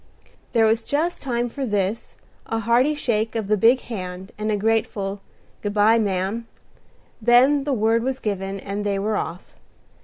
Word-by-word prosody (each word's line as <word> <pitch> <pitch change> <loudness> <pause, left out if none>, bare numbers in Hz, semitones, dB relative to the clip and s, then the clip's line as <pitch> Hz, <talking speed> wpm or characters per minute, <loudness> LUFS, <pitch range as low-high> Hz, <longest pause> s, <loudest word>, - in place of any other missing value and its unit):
There 225 -2 +4
was 220 +1 +3
just 315 +7 -1
time 240 -3 -1
for 275 +4 -5
this, 205 -2 -2 0.3
a 225 - -1
hearty 240 +6 +2
shake 225 -5 -1
of 225 -2 -1
the 215 +2 +2
big 230 +5 +4
hand, 185 -4 -6
and 215 0 -2
a 210 - +1
grateful 205 -2 -1 0.4
"Good 205 0 -3
by, 215 +2 +5
ma'am;" 200 +2 -1 0.7
then 260 +5 +5
the 290 - 0
word 225 0 +2
was 260 +2 -1
given, 195 -3 -3
and 200 +2 -4
they 200 -1 0
were 210 +2 -1
off. 180 -2 -5
220 Hz, 165 wpm, -23 LUFS, 200-240 Hz, 0.7 s, by